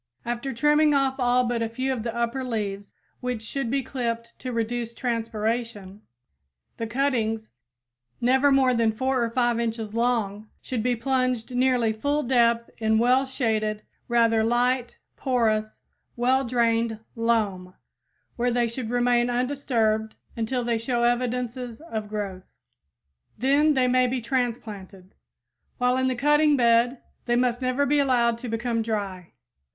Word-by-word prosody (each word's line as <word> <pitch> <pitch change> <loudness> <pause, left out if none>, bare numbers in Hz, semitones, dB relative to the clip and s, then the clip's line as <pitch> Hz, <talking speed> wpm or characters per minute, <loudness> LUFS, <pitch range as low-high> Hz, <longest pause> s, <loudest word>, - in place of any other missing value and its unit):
After 240 +3 -3
trimming 295 +4 +3
off 270 -1 +1
all 250 0 +3
but 240 -1 -1
a 225 - -1
few 260 +3 -2
of 245 - -4
the 230 +1 -4
upper 235 +3 -1
leaves, 205 -5 -4 0.2
which 250 -3 -3
should 270 +1 -3
be 275 +2 0
clipped 235 -2 -4
to 255 - -5
reduce 230 0 -2
transpiration, 225 -4 -3 0.8
the 230 - -3
cuttings 225 -3 -1 0.7
never 265 +4 +3
more 265 -2 +4
than 230 -2 +2
4 260 +3 0
or 230 - 0
5 240 0 +1
inches 225 -2 -3
long 220 -3 -1
should 250 -4 -3
be 245 +2 +1
plunged 255 -1 -1
nearly 245 -3 +2
full 285 +7 -1
depth 235 -2 +2
in 220 -1 +2
well 250 +4 +3
shaded, 215 -5 -1 0.2
rather 230 -2 +3
light, 245 +2 +1 0.2
porous, 220 -4 0 0.3
well 260 +2 +2
drained 230 -2 +1 0.2
loam 210 -6 0 0.6
where 245 +1 +1
they 240 0 +1
should 230 0 -5
remain 245 0 +2
undisturbed 240 -4 0 0.2
until 240 +2 -1
they 235 -1 0
show 235 +1 -1
evidences 245 0 -1
of 220 -10 -6
growth. 200 -3 -5 0.9
Then 285 +5 +3
they 255 -1 +3
may 255 0 +3
be 255 +1 -1
transplanted. 220 -7 -4 0.6
While 250 0 +2
in 260 0 +1
the 255 - 0
cutting 295 +3 +3
bed 240 +1 +3 0.2
they 240 - +2
must 245 0 +1
never 255 +2 +1
be 290 +1 +2
allowed 240 -4 +2
to 245 0 -6
become 230 +1 -1
dry. 200 -5 -4
240 Hz, 145 wpm, -25 LUFS, 225-255 Hz, 0.9 s, more